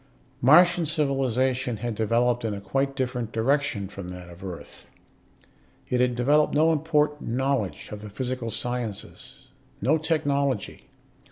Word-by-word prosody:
Martian 175 +6 +6
civilization 130 -4 0
had 120 +2 -3
developed 115 +3 +1
in 110 -2 -1
a - - -5
quite 135 +8 -1
different 125 -4 -2
direction 120 -3 0
from 95 -2 -8
that 90 -1 -9
of 85 +2 -13
Earth. 90 -3 -9 1.0
It 125 0 +1
had 125 -1 +2
developed 145 +6 +3
no 160 +2 +4
important 150 -2 0
knowledge 125 - -1
of 105 -1 -7
the 105 - -8
physical 125 +2 -3
sciences, 115 -1 -5 0.3
no 155 +5 +2
technology. 140 - -1
125 Hz, 135 wpm, -26 LUFS, 110-140 Hz, 1.0 s, Martian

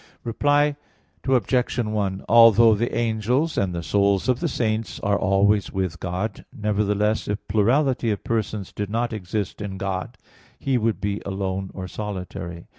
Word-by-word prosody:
Reply 145 +4 +2 0.5
Obj. 125 0 +1
1: 105 -4 -1
Although 115 -1 +7
the 115 +3 -1
angels 120 +7 0
and 95 -2 0
the 85 - -3
souls 100 +2 +2
of 125 -1 +2
the 170 - 0
saints 110 -5 -2
are 100 0 +1
always 100 +1 +2
with 95 -3 -2
God, 95 +4 -3
nevertheless, 105 0 0
if 105 0 -4
plurality 120 +4 +2
of 105 - -2
persons 110 -4 -2
did 105 -1 -4
not 115 +2 -1
exist 105 0 -4
in 100 -2 -5
God, 95 +4 -4 0.4
He 130 -2 0
would 110 -1 0
be 100 0 -2
alone 95 -1 -3
or 95 -1 -5
solitary. 90 -4 -6
105 Hz, 150 wpm, -23 LUFS, 95-115 Hz, 0.5 s, Although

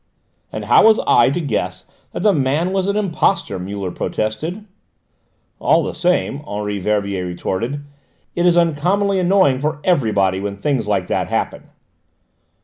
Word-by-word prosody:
"And - - -5
how - - +6
was 220 0 +5
I 120 +1 +5
to 140 - -1
guess 140 -10 -3 0.3
that - - -5
the 210 -2 +4
man 150 +5 0
was 190 -1 0
an 200 - 0
impostor?" 190 - 0
Muller 95 0 -5
protested. 160 - -3 0.9
"All - - +3
the - - -4
same," 175 -5 0
Henri 105 0 -3
Verbier 100 -1 -1
retorted, 115 +11 -3 0.5
"it 175 0 +2
is 175 -1 +4
uncommonly 180 +5 +1
annoying 180 -7 +3
for 150 +1 -2
everybody 105 - +1
when 100 0 -4
things 125 +1 -1
like 100 -3 0
that - - -1
happen." - - -3
140 Hz, 145 wpm, -19 LUFS, -, 0.9 s, how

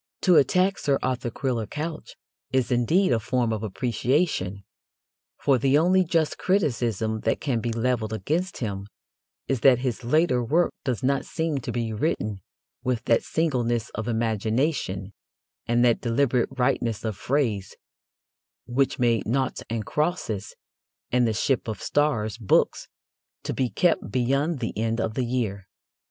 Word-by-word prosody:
To 180 -4 +5
attack 180 +7 +3
Sir 140 -1 +2
Arthur 130 -1 -1
Quiller 120 -3 -2
Couch 155 +5 -5 0.4
is, 130 -2 +1
indeed, 140 +11 +3
a 115 - +2
form 120 +1 0
of 110 - -3
appreciation, 115 - -1 0.7
for 135 -3 +2
the 135 +4 +3
only 185 +4 +4
just 165 -3 0
criticism 120 - 0
that 110 - 0
can 130 -6 -1
be 120 - -2
levelled 115 -1 0
against 155 - -2
him 100 -4 -4 0.6
is 135 - 0
that 130 0 +6
his 125 -1 -2
later 130 -1 +2
work 165 +9 +2
does 125 -4 -2
not 140 +1 +1
seem 160 -3 -2
to 120 - -5
be 115 -2 -2
written 105 - -1 0.4
with 125 -3 -1
that 115 - +3
singleness 120 -8 0
of 110 +1 -5
imagination 110 - -1 0.5
and 120 +1 +3
that 120 -2 +3
deliberate 125 0 +1
rightness 125 -4 0
of 110 -2 -2
phrase 115 -7 -1 0.9
which 135 +2 0
made 120 -2 +1
Noughts 130 +3 0
and 110 -2 -2
Crosses 150 - -2 0.6
and 125 -1 +3
The - - +1
Ship 125 +3 0
of 110 -4 -4
Stars 115 -7 0
books 105 - +2 0.6
to - - -3
be 130 -2 0
kept 175 +6 +1
beyond 135 +4 0
the 115 - -3
end 115 +1 -1
of 110 - -1
the 125 +2 -1
year. 110 -6 -2
125 Hz, 150 wpm, -25 LUFS, 110-140 Hz, 0.9 s, that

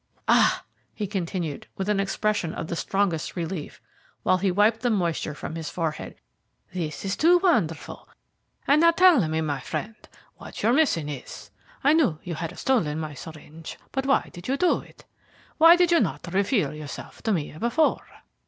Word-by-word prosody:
"Ah!" - - +4 0.3
he 210 - -3
continued, 180 -5 -4
with 190 - -3
an 210 -1 +1
expression 195 -3 -1
of - - -4
the 170 - -4
strongest 185 -3 -1
relief, 170 -2 -5 0.4
while 185 - +3
he 195 +1 +1
wiped 210 +4 +3
the 245 - +1
moisture 170 -7 -1
from 155 - -6
his 160 -2 -5
forehead. 165 -3 -4 0.6
"This 160 -2 -4
is 195 - -1
too 345 +3 +5
wonderful. 310 - 0 0.6
And 290 +2 +5
now 335 - +7
tell 335 - +5
me, 160 +1 -1
my 145 -3 -2
friend, 210 - -5 0.4
what - - -9
your 230 +3 +4
mission 260 - +2
is? 145 -3 -8 0.3
I 290 - +5
knew 280 - +2
you 175 - -5
had 165 0 -5
stolen 165 - 0
my 155 -2 -5
syringe, 155 +2 -10
but 270 0 -2
why 275 - +2
did 175 +2 -9
you 270 +2 0
do 360 +2 +2
it? - - -17 0.5
Why 330 +2 +9
did 355 -1 +3
you 340 - +5
not 170 - -2
reveal 195 - +1
yourself 150 -2 -9
to 220 - -1
me 155 -6 -2
before? 270 - +1
190 Hz, 175 wpm, -25 LUFS, 160-255 Hz, 0.6 s, Why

